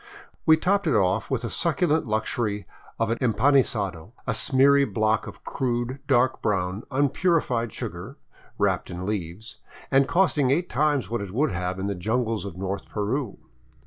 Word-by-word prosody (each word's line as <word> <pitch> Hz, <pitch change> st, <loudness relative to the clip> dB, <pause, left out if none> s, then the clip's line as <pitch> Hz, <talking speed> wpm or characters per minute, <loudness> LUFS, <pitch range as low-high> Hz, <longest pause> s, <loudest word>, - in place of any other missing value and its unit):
We 160 Hz, 0 st, +7 dB
topped 195 Hz, +3 st, +1 dB
it 150 Hz, -, +2 dB
off 100 Hz, +1 st, +1 dB
with 130 Hz, -3 st, -1 dB
the 115 Hz, -, -3 dB
succulent 160 Hz, -, +1 dB
luxury 110 Hz, -1 st, -1 dB, 0.3 s
of 115 Hz, -1 st, +1 dB
an 115 Hz, -, -1 dB
empanisado, 110 Hz, -, +1 dB
a 115 Hz, -, 0 dB
smeary 140 Hz, +4 st, +4 dB
block 110 Hz, -4 st, 0 dB
of -, -, -11 dB
crude, 125 Hz, +1 st, -2 dB
dark 130 Hz, -1 st, +2 dB
brown, 95 Hz, -1 st, -1 dB
unpurified 140 Hz, -, +1 dB
sugar, -, -, -7 dB, 0.4 s
wrapped -, -, 0 dB
in 90 Hz, +1 st, -5 dB
leaves 100 Hz, +1 st, -5 dB, 0.3 s
and 135 Hz, 0 st, +4 dB
costing 165 Hz, -7 st, +2 dB
eight 170 Hz, +7 st, +1 dB
times 145 Hz, -6 st, +1 dB
what 120 Hz, -, -1 dB
it 100 Hz, -, -5 dB
would 135 Hz, +6 st, +1 dB
have 90 Hz, 0 st, -3 dB
in 95 Hz, -, -3 dB
the 100 Hz, -, -1 dB
jungles 110 Hz, +3 st, -1 dB
of 95 Hz, -3 st, -7 dB
north 95 Hz, +1 st, -4 dB
Peru. 110 Hz, +3 st, -2 dB
115 Hz, 160 wpm, -25 LUFS, 100-140 Hz, 0.4 s, We